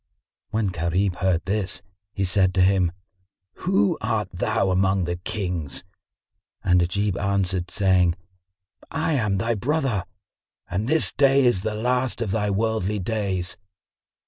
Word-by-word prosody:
When 110 -1 0
Gharib 90 +2 0
heard 90 -3 +1
this, 100 0 -2 0.3
he 95 -1 -1
said 95 0 +2
to 95 - +4
him, 95 -2 +3 0.8
"Who 185 -2 +2
art 105 -4 -1
thou 95 +2 0
among 95 0 +2
the 85 0 -2
Kings?" 90 -7 -3 0.8
And 90 -1 +4
Ajib 100 +3 0
answered, 95 -2 0
saying, 90 -4 +3 0.7
"I 160 0 -1
am 110 -8 +1
thy 115 +4 0
brother, 125 - 0 0.6
and 100 +6 -2
this 160 +4 +3
day 135 -1 +4
is 120 -7 +3
the 110 +1 -2
last 125 +3 0
of 115 -5 -1
thy 105 0 0
worldly 105 0 0
days." 95 -3 -2
100 Hz, 135 wpm, -24 LUFS, 90-110 Hz, 0.8 s, to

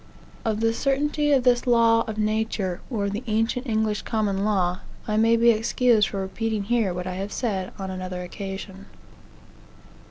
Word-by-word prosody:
Of 220 -1 -1
the 225 0 +2
certainty 295 +3 0
of 270 -3 +4
this 245 0 +3
law 230 -1 +5
of 220 -1 -5
nature, 215 -4 -1
or 210 -6 -1
the 205 +3 -3
ancient 225 +4 0
English 220 -2 0
common 205 -3 -1
law, 185 -4 +1 0.3
I 215 - 0
may 225 +2 +4
be 235 +1 +6
excused 225 -1 +3
for 195 - -4
repeating 210 +2 -2
here 225 -2 +1
what, 180 0 -4
I 185 - -3
have 195 +3 -4
said 195 -6 -2
on 190 -1 -5
another 185 -1 -5
occasion. 195 +1 -7
215 Hz, 165 wpm, -24 LUFS, 195-230 Hz, 0.3 s, be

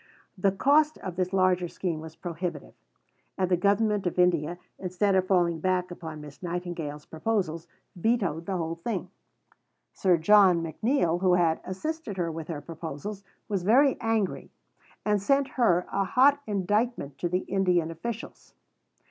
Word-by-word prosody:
The 195 0 +2
cost 295 +9 +3
of 185 -2 -6
this 185 0 -1
larger 185 -2 +2
scheme 170 -2 -3
was 160 0 -10
prohibitive; 170 -3 -5 0.6
and 185 -1 0
the - - +6
Government 200 +2 +2
of 175 - -3
India, 175 -2 +2 0.2
instead 190 +2 0
of 185 -1 +2
falling 175 -3 +2
back 180 +1 0
upon 160 -3 -7
Miss 145 -2 -12
Nightingale's 170 -4 -4
proposals, 165 -2 -2 0.3
vetoed 180 -5 0
the 190 -2 -1
whole 165 0 -3
thing. 235 - -3 0.8
Sir 185 -3 +3
John 185 0 +5
McNeill, 175 - 0
who 185 -2 +4
had 165 -2 +2
assisted 240 - -5
her 170 -2 -1
with 160 -1 -6
her 155 -4 -5
proposals, 165 +5 -7 0.2
was 200 -4 -1
very 260 +9 +4
angry, 225 -4 -1 0.6
and 210 -2 +2
sent 275 +6 +2
her 180 -9 +2
a 195 0 +1
hot 275 +8 +4
indictment 205 - -1
of 175 - +1
the 180 +2 0
Indian 180 -4 +1
officials. 220 +8 -7
180 Hz, 150 wpm, -27 LUFS, 170-205 Hz, 0.8 s, the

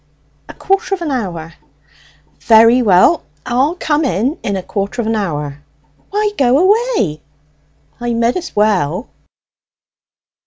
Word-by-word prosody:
"A - - -10
quarter 390 0 0
of 355 - -7
an 310 - -3
hour." 170 -10 -4 0.9
"Very 230 +2 +5
well; 210 - +4 0.2
I'll 265 +7 +1
come 310 -3 0
in 260 - -1
in 200 - -2
a 190 - -4
quarter 195 +4 -4
of 230 - -1
an 225 - 0
hour." 150 -8 -3 0.5
"Why 420 +1 0
go 255 -1 +4
away?" 385 - +1 0.8
"I 240 -1 -2
mid 235 +1 +1
as 365 -1 -5
well." 205 - 0
235 Hz, 130 wpm, -16 LUFS, 190-310 Hz, 0.9 s, Very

